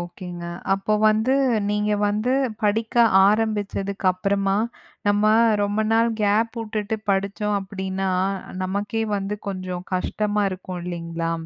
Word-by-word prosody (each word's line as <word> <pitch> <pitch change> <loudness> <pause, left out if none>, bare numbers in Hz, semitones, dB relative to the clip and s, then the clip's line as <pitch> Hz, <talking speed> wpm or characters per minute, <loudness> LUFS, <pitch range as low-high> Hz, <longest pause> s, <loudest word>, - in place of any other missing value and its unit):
ஓகேங்க. 175 0 -7 0.3
அப்ப 210 +2 0
வந்து 220 +5 +2 0.4
நீங்க 210 0 0 0.2
வந்து 215 +5 0 0.3
படிக்க 220 +3 0 0.3
ஆரம்பிச்சதுக்கு 205 -2 -1
அப்பறமா 195 +1 0 0.5
நம்ம 205 +1 +2 0.4
ரொம்ப 205 +1 0
நாள் 230 +1 +3
கேப் 215 +3 +2
வுட்டுட்டு 215 0 -3
படிச்சோம் 200 +1 0
அப்படீன்னா, 190 -1 -3 0.5
நமக்கே 205 +4 -2
வந்து 200 +1 -3
கொஞ்சம் 185 -2 -4
கஷ்டமா 210 +3 0
இருக்கும் 185 -1 -6
இல்லிங்களா? 165 -1 -3
200 Hz, 110 wpm, -23 LUFS, 190-215 Hz, 0.5 s, நாள்